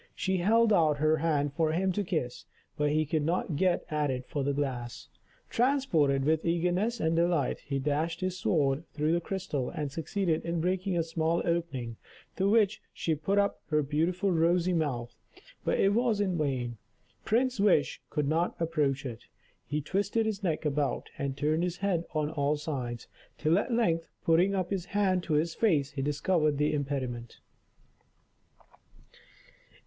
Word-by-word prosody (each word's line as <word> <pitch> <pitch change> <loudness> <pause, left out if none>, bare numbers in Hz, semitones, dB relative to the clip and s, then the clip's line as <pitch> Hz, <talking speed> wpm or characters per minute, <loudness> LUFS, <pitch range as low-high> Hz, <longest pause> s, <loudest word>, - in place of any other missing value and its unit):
She 190 -1 0
held 220 +5 +4
out 155 -5 +3
her 155 +2 +3
hand 145 -3 0
for 160 0 +1
him 190 +3 +1
to 205 +3 -1
kiss, 125 -9 -3 0.3
but 150 0 +1
he 155 +1 +2
could 155 +1 0
not 165 +1 -1
get 180 +3 +1
at 150 -1 +1
it 130 -1 -3
for 145 +1 -3
the 140 - +1
glass. 130 -4 -4 0.4
Transported 180 - +2
with 155 +1 +2
eagerness 180 +7 0
and 160 +1 +1
delight, 170 -4 +1
he 140 -1 -3
dashed 150 +4 -1
his 185 0 -1
sword 150 -6 +1
through 150 +1 0
the 170 - +1
crystal, 165 -9 -3
and 145 -2 -4
succeeded 165 +2 -1
in 170 0 -2
breaking 185 +2 0
a 165 - +2
small 165 +1 0
opening, 145 -10 -2 0.4
to 195 +1 +1
which 215 -1 +3
she 165 - -1
put 155 +7 -1
up 200 0 +1
her 150 -1 +2
beautiful 170 +7 0
rosy 175 +2 +2
mouth. 135 -8 -1 0.5
But - - 0
it 195 +1 +4
was 230 -2 +2
in 190 -3 +1
vain, 130 -6 -1 0.5
Prince 250 +1 +1
Wish 195 -7 +3
could 150 -2 -1
not 165 +4 +1
approach 150 -5 0
it. 115 -4 -7 0.4
He 150 +1 -1
twisted 200 +8 0
his 215 -2 -2
neck 165 -5 -1
about, 145 -2 -1
and 140 -1 -2
turned 155 +3 +1
his 175 0 -1
head 185 -4 0
on 155 0 0
all 145 -1 0
sides, 130 -6 -4 0.3
till 160 +5 +3
at 240 - -3
length, 170 -9 +1 0.2
putting 175 +4 +4
up 185 -1 -2
his 190 -3 -1
hand 195 -2 +1
to 160 - -1
his 160 +2 +1
face, 150 -11 +2
he 140 -2 -4
discovered 150 +1 +1
the 150 +1 +1
impediment. 130 -5 -3
160 Hz, 170 wpm, -29 LUFS, 145-185 Hz, 0.5 s, held